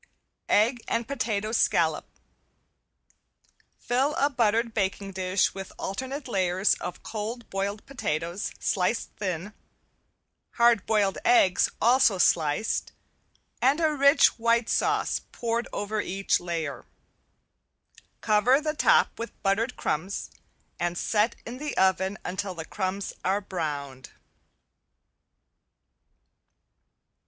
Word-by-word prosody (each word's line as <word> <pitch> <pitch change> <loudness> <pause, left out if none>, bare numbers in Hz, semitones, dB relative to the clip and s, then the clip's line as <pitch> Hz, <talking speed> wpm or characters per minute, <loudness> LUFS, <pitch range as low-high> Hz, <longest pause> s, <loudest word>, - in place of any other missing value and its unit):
~EGG 230 +4 +3
AND 230 -1 -1
POTATO 215 -6 -2
SCALLOP~ 230 - +2 1.7
Fill 265 +5 0
a 285 +1 +2
buttered 230 -1 +1
baking 195 -1 -2
dish 185 0 0
with 195 -1 -7
alternate 260 +8 -5
layers 190 -3 +2
of 180 - -6
cold 225 +2 -5
boiled 200 +2 -3
potatoes 170 - -3
sliced 190 +4 -1
thin, 190 0 -4 1.0
hard 235 -4 +3
boiled 205 -3 +1
eggs 350 - +4
also 235 -4 +4
sliced, 165 +2 +1 0.7
and 275 +5 +3
a 315 -2 +2
rich 280 -2 +4
white 230 0 +2
sauce - - +1
poured 235 0 -2
over 210 +1 -2
each 195 +1 0
layer. 165 -7 -4 1.3
Cover 220 +6 +4
the 305 0 -2
top 300 - +3
with 230 - -7
buttered 220 +6 +1
crumbs 180 +7 -3 0.5
and 175 0 -1
set 215 +4 +1
in 245 +3 -7
the 300 +1 -5
oven 190 +1 +2
until 185 +1 -3
the 160 -1 -6
crumbs 195 +2 -3
are 190 +2 +1
browned. 145 -9 -5
205 Hz, 105 wpm, -26 LUFS, 185-235 Hz, 1.7 s, eggs